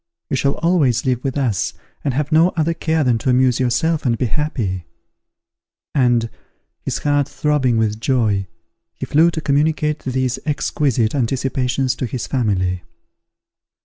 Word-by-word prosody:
You - - +2
shall 140 +1 +1
always 155 -9 +2
live 125 -2 0
with 135 0 -2
us, 120 -9 0 0.3
and 135 -4 -1
have 150 +2 -1
no 160 +3 +5
other 165 +1 +1
care 160 -1 0
than 120 -4 +2
to 130 - -1
amuse 125 0 +3
yourself 155 +6 +1
and 115 -3 +1
be 125 - 0
happy;" 105 - -2 1.1
and, 120 -4 +2 0.5
his - - -3
heart 145 -1 +1
throbbing 140 -4 +1
with 110 -1 0
joy, 110 -7 +1 0.5
he - - -5
flew 160 +3 +4
to 160 -1 -4
communicate 150 +1 +1
these 130 -1 -1
exquisite 140 -6 0
anticipations 130 0 0
to 130 - -2
his 120 +1 -4
family. 95 -8 0
130 Hz, 145 wpm, -19 LUFS, 120-150 Hz, 1.1 s, no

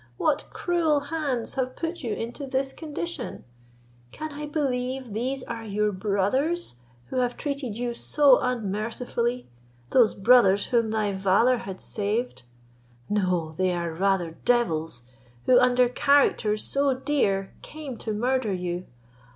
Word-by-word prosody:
What 295 - +1
cruel 330 -4 +1
hands 280 -7 -1
have 255 -1 -2
put 335 +1 -4
you 235 -5 -3
into 240 +5 -5
this 270 0 -1
condition? 320 -2 -5 0.7
Can 310 - -6
I 295 +1 -6
believe 260 -5 -2
these 255 +4 -2
are 230 -1 -6
your 210 0 0
brothers 205 - 0 0.3
who - - -2
have 245 -1 0
treated 280 -7 -3
you 240 0 -2
so 280 +2 +4
unmercifully, 235 +2 -2 0.4
those 240 -4 +5
brothers 200 -2 +5
whom 230 -2 +1
thy 215 -2 0
valour 195 +6 +3
had 190 -4 -7
saved? 210 - -2 0.7
No, 180 -6 0
they 185 -1 +1
are 170 -1 -2
rather 180 -2 0
devils, 165 - +1 0.4
who 250 -1 +6
under 250 0 +4
characters 245 -5 +2
so 275 -1 +1
dear 210 -9 0
came 300 -4 -8
to 220 - -4
murder 245 +1 0
you. 180 0 -3
240 Hz, 135 wpm, -26 LUFS, 200-270 Hz, 0.7 s, who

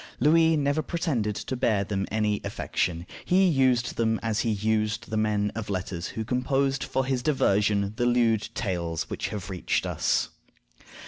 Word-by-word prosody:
Louis 160 +3 +4
never 145 +1 +1
pretended 135 - -1
to 130 - -4
bear 110 -5 +1
them 95 -1 -2
any 105 -1 0
affection; 85 -1 -2 0.2
he 190 +2 +3
used 130 -6 +2
them 110 -1 +1
as 110 -1 0
he 115 - 0
used 110 +1 -1
the - - -1
men 105 -1 +1
of 110 -2 -5
letters 90 -2 -3
who 110 - -2
composed 135 +2 0
for 130 - -1
his 130 -2 0
diversion 100 -7 +2
the 120 -1 +1
lewd 115 -3 +2
tales 85 -6 -2
which - - -2
have 100 -3 -6
reached 90 -3 -1
us. - - 0
110 Hz, 160 wpm, -26 LUFS, 100-130 Hz, 0.2 s, Louis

